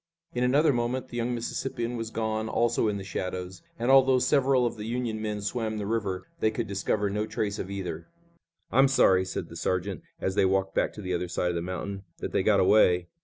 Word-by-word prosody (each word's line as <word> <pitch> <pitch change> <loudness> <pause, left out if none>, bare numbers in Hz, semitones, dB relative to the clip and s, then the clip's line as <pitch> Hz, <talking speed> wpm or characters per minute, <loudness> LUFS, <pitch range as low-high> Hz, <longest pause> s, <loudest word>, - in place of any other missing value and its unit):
In 125 - 0
another 145 +4 +4
moment 125 +2 -1
the 120 - -6
young 120 +1 -1
Mississippian 120 0 -3
was 115 -1 -4
gone 110 0 -2
also 115 -1 +1
in 105 -1 0
the 100 - -6
shadows, 90 -1 -5 0.2
and 120 +3 +1
although 135 -1 +6
several 130 0 +3
of 120 - -1
the 105 0 -6
Union 115 -2 -2
men 105 -1 -3
swam 110 0 -2
the 105 - -3
river 100 -4 -2
they 110 - +3
could 115 +1 -3
discover 100 +1 -1
no 105 +1 -1
trace 105 -1 -2
of 95 - -4
either. 90 -4 -5 0.6
"I'm 135 +2 +5
sorry," 95 -8 +4
said 95 - -4
the 85 - -10
sergeant 90 +2 -2 0.2
as 95 - -1
they 95 - +3
walked 95 0 +1
back - - +1
to 105 - -9
the 90 0 -2
other 90 0 -1
side 90 +1 -1
of 90 - -2
the 85 - -1
mountain, 90 +3 -4 0.2
"that - - -5
they - - +2
got - - +3
away." 90 -3 +4
110 Hz, 220 wpm, -27 LUFS, 95-120 Hz, 0.6 s, although